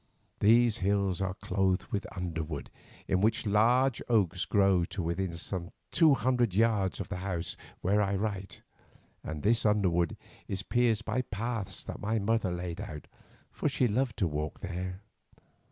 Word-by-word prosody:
These 115 +2 +5
hills 100 -1 +1
are 95 -1 -1
clothed 95 -3 0
with 100 - -2
underwood, 80 -5 -4 0.4
in 95 - +2
which 110 +3 +2
large 120 +5 +3
oaks 95 -6 +2
grow 95 -3 +3
to 90 +1 -4
within 85 +1 -2
some 85 +1 -4 0.2
two 160 -5 +6
hundred 120 -5 +1
yards 105 -3 +2
of - - -5
this 95 -2 -4
house 90 -3 -3 0.3
where 100 +3 +2
I 100 -1 +1
write, 95 -2 -4 0.6
and 75 -1 -5
this 115 +3 +3
underwood 90 -6 +2 0.3
is 100 0 -3
pierced 115 -1 +1
by 115 +4 0
paths 110 -2 -3
that - - -7
my 110 +2 0
mother 110 -2 +1
laid 90 -1 -4
out, 75 -1 -7 0.5
for - - -1
she 130 -2 +2
loved 120 +1 0
to 95 - +2
walk 75 -1 -4
here. 90 0 -5
100 Hz, 155 wpm, -30 LUFS, 90-110 Hz, 0.6 s, two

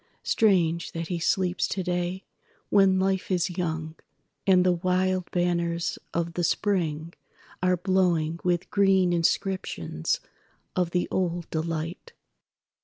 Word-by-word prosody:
Strange 170 -6 +2
that 165 0 -4
he 175 -2 -2
sleeps 180 +1 +1
today 180 0 -2 0.5
when 195 -2 +5
Life 190 0 0
is 180 -1 +1
young, 160 -3 -2 0.5
And 185 -1 +5
the 180 - +5
wild 185 +1 0
banners 170 -1 0
of 170 0 -2
the 175 - -2
Spring 165 -4 0 0.5
are 180 0 +2
blowingWith 175 -2 +1
green 190 -3 +3
inscriptions 165 - -1 0.6
of 180 -2 +1
the 180 +1 0
old 175 -2 -1
delight." 165 - -4
175 Hz, 110 wpm, -26 LUFS, 170-185 Hz, 0.6 s, when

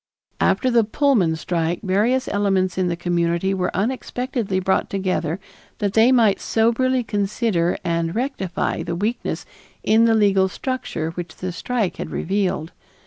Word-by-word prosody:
After 255 - +2
the 235 -1 +4
Pullman 215 - +2
strike 165 +1 -2
various 220 +7 +1
elements 195 -3 +1
in 185 -1 0
the 175 - -1
community 170 +2 0
were 185 -1 0
unexpectedly 240 -2 -2
brought 190 +1 0
together 185 -3 -1 0.4
that 205 -2 -1
they 225 +3 +5
might 225 -6 +4
soberly 245 +3 +2
consider 205 -4 0
and 165 0 -1
rectify 230 -10 -2
the 170 0 -3
weakness 215 +7 -2 0.4
in 225 +1 +4
the 225 -1 +4
legal 195 -3 +4
structure 185 -7 -3
which 170 -1 -7
the 185 0 -4
strike 220 +1 -2
had - - -5
revealed. 185 -3 -1
195 Hz, 140 wpm, -22 LUFS, 175-230 Hz, 0.4 s, they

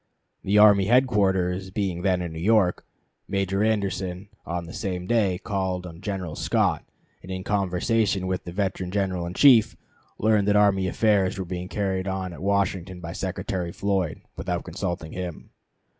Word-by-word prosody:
The 100 +2 +2
army 105 -2 +7
headquarters 95 -6 +2
being 95 -3 -2
then 90 -1 +1
in 85 -2 -5
New 80 - -6
York, 100 0 +2 0.4
Major 100 0 0
Anderson 100 -3 -1 0.2
on 85 0 -3
the 85 - -10
same 90 -3 -3
day 100 -4 +2
called 95 -3 -2
on 85 -1 -10
General 95 -6 -4
Scott, - - +1 0.4
and 95 - -9
in 95 0 -4
conversation 100 +1 0
with 95 0 -2
the 85 - -7
veteran 95 -1 -2
General 95 -3 -1
in 90 - -7
Chief 115 -5 +6 0.4
learned 105 -2 +2
that 105 - +3
army 100 -2 +4
affairs 100 0 +2
were 95 - -3
being 90 0 -5
carried 95 -2 -2
on 95 -1 -3
at - - -10
Washington 95 -2 -1
by 85 -1 -6
Secretary 95 -2 -3
Floyd, 95 -5 -1
without - - -3
consulting 80 -2 -4
him. 90 -3 -6
95 Hz, 160 wpm, -25 LUFS, 90-100 Hz, 0.4 s, army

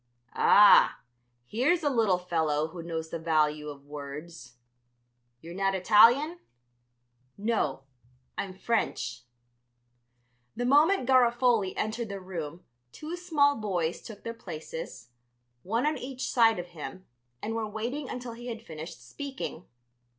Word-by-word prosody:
"Ah, 205 0 +6 0.5
here's 270 - +1
a 290 - +3
little 220 -7 +3
fellow 160 -4 0
who 170 +1 -8
knows 165 -1 -4
the 165 - -4
value 155 -2 +1
of 140 -1 -10
words. 145 -2 -9 0.9
You're 170 +1 -9
not 195 +1 0
Italian?" 230 - +5 1.0
"No, 200 -11 -1 0.5
I'm 195 - -3
French." 190 - -1 1.3
The 245 - -2
moment 295 +3 +4
Garofoli 240 -5 +3
entered 220 +1 -2
the 200 0 -5
room 175 -3 -6 0.3
two 310 - -6
small 305 -5 +2
boys 180 -6 -2
took 210 -3 -11
their 230 - -4
places, 160 - -8 0.5
one 225 - -1
on 300 -2 0
each 255 +1 -4
side 225 -2 +5
of 175 0 -6
him, 175 +3 -8 0.3
and 220 - -4
were 225 -1 -2
waiting 240 +7 -4
until 245 -1 -6
he 240 +1 -9
had 230 -2 -6
finished 160 +1 -9
speaking. 270 - -6
205 Hz, 130 wpm, -28 LUFS, 165-245 Hz, 1.3 s, Ah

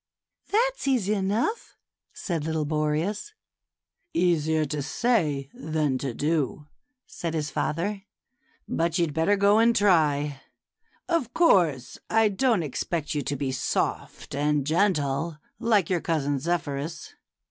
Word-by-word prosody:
"That's - - +1
easy 225 -7 +2
enough," 210 - -1 0.3
said 170 -5 -3
little 160 -1 -1
Boreas. 155 - -1 0.4
" - - -55
Easier 160 -3 +2
to 150 0 -3
say 150 - 0
than 150 -3 -1
to 135 -1 -3
do," 150 -1 -1 0.4
said 165 -1 -5
his 155 -1 -2
father; 195 +6 -2 0.3
" - - -51 0.3
but 165 0 0
you'd 170 -4 0
better 165 +6 +2
go 200 +2 +4
and 230 +1 +4
try. 150 -7 +2 0.7
Of 315 -9 -1
course 170 - +3
I 225 -1 +4
don't 215 -2 +1
expect 150 +2 -3
you 150 - -1
to 140 +1 -3
be 135 -1 -2
soft 130 - -2
and 145 0 +1
gentle, 155 -3 +1 0.2
like 210 -6 +2
your 175 -3 +1
cousin 145 -4 0
Zephyrus. 155 0 -3
160 Hz, 130 wpm, -26 LUFS, 150-205 Hz, 0.7 s, go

